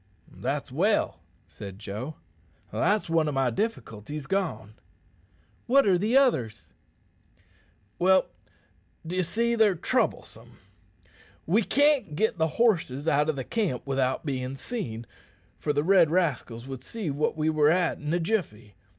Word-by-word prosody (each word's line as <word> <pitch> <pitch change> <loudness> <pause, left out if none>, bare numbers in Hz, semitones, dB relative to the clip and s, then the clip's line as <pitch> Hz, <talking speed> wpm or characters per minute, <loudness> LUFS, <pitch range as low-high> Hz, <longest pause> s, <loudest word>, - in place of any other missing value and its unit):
"That's - - -3
well," - - +1 0.3
said 100 -1 -9
Joe. 110 +8 -6 0.6
"That's 195 - +1
one 165 -2 +2
o' - - -2
my 135 -3 +1
difficulties 145 - -4
gone." 170 - -2 0.9
"What 275 +3 +5
are 195 -3 +4
the 220 +7 +2
others?" 120 - +1 1.3
"Well, 190 +1 +4 0.8
d'ye 180 +3 -1
see, 235 +6 0
they're 220 -4 +4
troublesome. 160 - -2 0.9
We 200 +8 +3
can't 285 - +2
git 215 0 0
the 160 - +3
horses 165 - +1
out 150 0 +2
o' 140 -4 -1
camp 195 - -2
without 135 +1 -1
bein' 130 -2 -3
seen, 120 - -5 0.5
for 150 - -1
the 145 0 0
red 175 -2 +5
rascals 140 -9 -1
would 130 -1 -7
see 210 -5 -4
what 150 +3 -1
we 155 0 +1
were 150 -1 +4
at 175 +1 +1
in 150 0 -4
a 175 - +1
jiffy. 160 - -2
155 Hz, 135 wpm, -27 LUFS, 130-195 Hz, 1.3 s, What